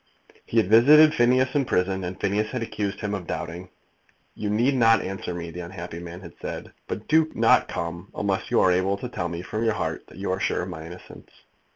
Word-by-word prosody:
He 115 - -2
had 110 - +5
visited 150 +9 +7
Phineas 130 +1 +3
in 145 - +2
prison, 95 -2 0
and 90 +1 -5
Phineas 105 +2 0
had 125 -2 -3
accused 105 -2 -4
him 105 -1 -2
of 95 -4 -5
doubting. 90 +2 -5 0.6
"You 105 - -4
need 120 +6 +2
not 115 -4 +5
answer 95 -1 -5
me," 85 -1 -5
the 90 - -8
unhappy 85 -1 -7
man 85 +1 -9
had 85 -3 -11
said, - - -6
"but 105 - -5
do 160 0 +3
not - - +4
come 85 +3 -5
unless 100 +1 -1
you 120 - +3
are 95 - +4
able 95 +2 +1
to 125 - -5
tell 90 -7 -3
me 85 +1 -5
from 110 +4 -3
your 110 -1 +2
heart - - -4
that - - -15
you 95 -1 -2
are 95 - -1
sure 90 - 0
of 90 - -6
my 80 -2 -7
innocence. 90 +2 -12
100 Hz, 225 wpm, -25 LUFS, 90-115 Hz, 0.6 s, visited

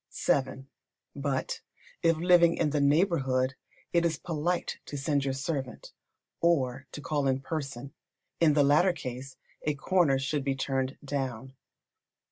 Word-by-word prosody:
vii. 135 -1 +1 0.5
But, 140 -2 -2 0.4
if 165 -1 +3
living 170 0 +5
in 150 -3 +1
the 145 -1 +1
neighbourhood, 140 -4 +2 0.4
it 170 -1 +4
is 165 -3 +1
polite 170 +2 -2
to 145 - -5
send 140 0 0
your 135 - 0
servant, 135 -2 -4 0.5
or 135 -6 +1
to 150 - -6
call 145 -1 -1
in 130 0 +1
person. 135 -2 -5 0.5
In 160 -3 +5
the 145 - +5
latter 155 +6 +4
case 130 -4 -7 0.2
a 150 -1 -1
corner 155 -2 +2
should 140 +1 -1
be 135 -1 0
turned 135 0 -2
down. 130 -3 -3
140 Hz, 140 wpm, -29 LUFS, 135-160 Hz, 0.5 s, living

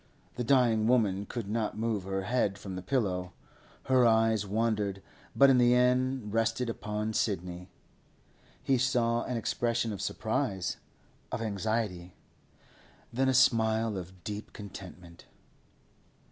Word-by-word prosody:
The 125 - -3
dying 115 -4 +3
woman 105 -5 +2
could 115 -5 -5
not 110 0 -2
move 110 -4 -1
her 95 0 -2
head 105 -3 0
from 95 -1 -7
the 90 - -5
pillow; 90 -5 -1 0.5
her 130 -1 +3
eyes 110 -2 +3
wandered, 105 -2 -1 0.3
but 140 -1 +7
in 130 - +4
the 120 0 +5
end 125 -2 +1
rested 115 +2 0
upon 105 0 -4
Sidney. 90 -4 -2 0.9
He 135 -2 +2
saw 120 -2 +1
an 125 - -2
expression 115 0 -1
of 95 - -6
surprise, 110 -2 -2 0.5
of 125 - -2
anxiety, 105 -4 -2 1.0
then 130 +2 +2
a 130 - +2
smile 110 -3 +3
of 95 -1 -8
deep 105 -1 -6
contentment. 90 -4 -11
110 Hz, 130 wpm, -30 LUFS, 100-120 Hz, 1.0 s, but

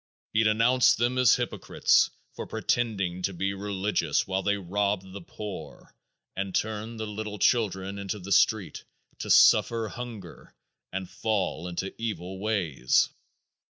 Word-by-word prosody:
He 110 - +3
denounced 115 +4 +4
them 120 +3 +1
as 125 -4 +6
hypocrites - - +2 0.2
for - - -7
pretending 95 -7 -1
to 95 +1 -1
be 95 +2 -1
religious 100 -5 -1
while 95 0 -1
they 100 +1 +1
robbed 100 0 -2
the 100 - -7
poor 95 -9 -9 0.4
and 95 -1 -3
turned 110 +1 -2
the 110 - -2
little 105 0 -5
children 100 -3 +1
into 100 +1 -4
the 100 0 -9
street 105 0 +2 0.4
to - - -5
suffer 115 -2 +5
hunger 115 -8 -9 0.4
and 95 -1 -4
fall 95 -6 -2
into 90 +2 -4
evil 95 -4 -4
ways. 90 -12 +1
100 Hz, 135 wpm, -27 LUFS, 95-110 Hz, 0.4 s, as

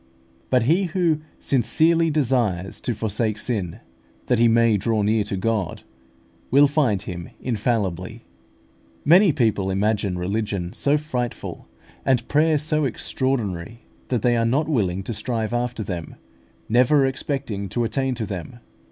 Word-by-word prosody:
But 125 -3 +3
he 170 +10 +3
who 170 -3 +1 0.2
sincerely 165 +6 +2
desires 120 - 0
to 120 - -2
forsake 110 0 -1
sin, 105 -7 -3 0.4
that 125 - +1
he 120 - +6
may 115 -1 +4
draw 110 +1 0
near 105 +1 +2
to 100 -1 -3
God, 105 -2 -2 0.7
will 140 +3 +6
find 130 -10 +1
Him 85 -3 -7
infallibly. 110 -3 -2 0.8
Many 180 +4 +6
people 110 -8 +1
imagine 100 -1 0
religion 95 -1 -2
so 145 +1 +2
frightful, 125 -6 -4 0.4
and 125 -3 +1
prayer 155 +1 +3
so 155 +1 0
extraordinary, 115 -6 -2 0.3
that 125 -5 -1
they 120 -1 +3
are 115 - +2
not 135 +7 +1
willing 95 - 0
to 115 - -4
strive 110 +1 -2
after 120 -2 -2
them, 90 -4 -6 0.5
never 130 +5 +4
expecting 130 -7 -3
to 120 +5 -1
attain 130 +2 -1
to 115 -2 -3
them. 100 +5 -6
115 Hz, 140 wpm, -23 LUFS, 100-135 Hz, 0.8 s, he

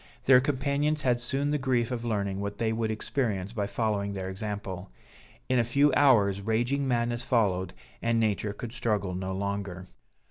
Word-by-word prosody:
Their 130 -1 +7
companions 145 +2 0
had 125 -2 +2
soon 135 +4 0
the 150 - +1
grief 125 -3 0
of 120 -2 -3
learning 100 -4 -1
what 100 0 -4
they 115 -1 0
would 110 0 -1
experience 110 -3 -2
by 105 -3 -1
following 100 -2 -1
their 95 -1 -4
example; 95 -2 -5 0.6
in 130 -1 +2
a - - +4
few 140 +5 +3
hours 105 -9 +4
raging 120 +6 0
madness 120 -1 +1
followed, 95 -7 +1 0.3
and 115 0 +1
nature 105 -2 0
could 110 +2 -7
struggle 105 -6 -1
no 95 +1 -3
longer. 100 -1 -3
110 Hz, 170 wpm, -28 LUFS, 100-125 Hz, 0.6 s, Their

